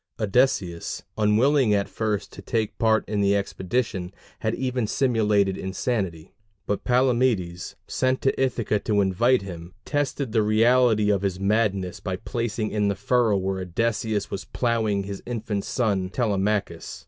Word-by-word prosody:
Odysseus, 105 -6 0
unwilling 110 +3 +3
at 100 -1 0
first 105 -2 -3
to - - -9
take 110 -3 -2
part 110 -1 +2
in 105 -1 -1
the 100 0 +3
expedition, 100 -1 -2 0.3
had - - -1
even 125 -3 -1
simulated 105 -6 +2
insanity; 95 -4 -3 0.3
but 105 - -2
Palamedes, 120 -8 +1
sent 130 0 0
to 135 - +1
Ithaca 115 -5 0
to 105 -1 +1
invite 100 +5 +2
him, 85 -2 -9
tested 145 -3 -1
the 110 -1 +3
reality 110 0 +4
of 100 -2 +1
his 95 -2 -2
madness 100 -3 0
by 95 -2 -3
placing 115 +1 -3
in 105 -1 +1
the 100 - 0
furrow 115 -1 +2
where 95 0 -2
Odysseus 110 +3 -1
was 95 - -4
ploughing 110 -4 0
his 100 0 -6
infant 110 -4 -3
son 100 -7 0
Telemachus. 105 -2 -1
105 Hz, 145 wpm, -24 LUFS, 100-120 Hz, 0.3 s, reality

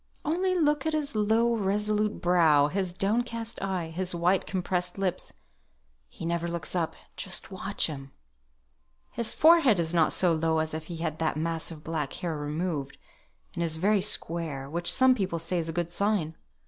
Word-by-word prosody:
"Only 365 +5 +1
look 295 -3 +2
at 315 - 0
his 295 -2 -1
low, 220 +3 +2
resolute 210 0 0
brow, 160 -5 +4
his 185 +1 -1
downcast 230 +4 -2
eye, 185 -4 -2
his 180 +2 -2
white 180 +3 +1
compressed 180 -1 -1
lips. 190 -2 -2 0.8
He 165 - -8
never 170 0 -1
looks 170 -3 -3
up, 165 -2 -1 0.2
just 190 +1 -4
watch 195 +2 0
him." 135 -3 -6 1.0
"His 235 -1 0
forehead 315 - +6
is 165 0 0
not 165 -3 +3
so 180 -2 +3
low 160 0 +1
if 155 0 -3
he 170 - -6
had 160 -1 -3
that 160 -1 0
mass 165 0 -2
of 155 -2 -10
black 155 -3 -3
hair 170 -3 -3
removed, 150 -1 -3 0.6
and - - -4
is 160 -1 -1
very 200 +4 +2
square, 165 -8 -2
which 170 +4 0
some 260 0 +5
people 190 -8 -2
say 165 +2 -2
is 165 -1 -2
a - - -1
good 170 0 -2
sign. 190 -4 0
175 Hz, 175 wpm, -28 LUFS, 160-210 Hz, 1.0 s, forehead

